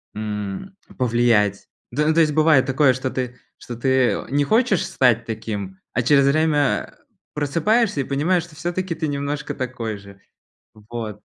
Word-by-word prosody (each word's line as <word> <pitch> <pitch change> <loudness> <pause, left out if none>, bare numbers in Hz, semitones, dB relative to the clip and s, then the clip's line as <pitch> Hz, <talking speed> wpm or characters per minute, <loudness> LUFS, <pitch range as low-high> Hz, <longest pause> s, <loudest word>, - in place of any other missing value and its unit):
м, 105 - -5 0.2
повлиять. 115 -5 +2 0.2
Да, 150 +5 0
ну, 160 - +3
то 165 - +5
есть, 150 -2 +2
бывает 155 -4 +4
такое, 135 0 +3
что 130 +1 -3
ты 125 -1 -4 0.2
что 120 - -8
ты, 125 +3 -3 0.2
э, - - -3
не 145 +2 +2
хочешь 220 - +2
стать 120 -3 +2
таким, 105 -4 -5
а 120 - +1
через 140 +3 +4
время, 145 -1 +2
а, - - -16 0.4
просыпаешься 165 +6 +1
и - - -1
понимаешь, 155 +7 0
что 165 -2 -14
всё-таки 175 +1 -2
ты 160 -1 -2
немножко 145 +1 -3
такой 120 -4 -4
же. 100 0 -15 0.5
Вот. 110 -1 -7
135 Hz, 165 wpm, -22 LUFS, 115-155 Hz, 0.5 s, то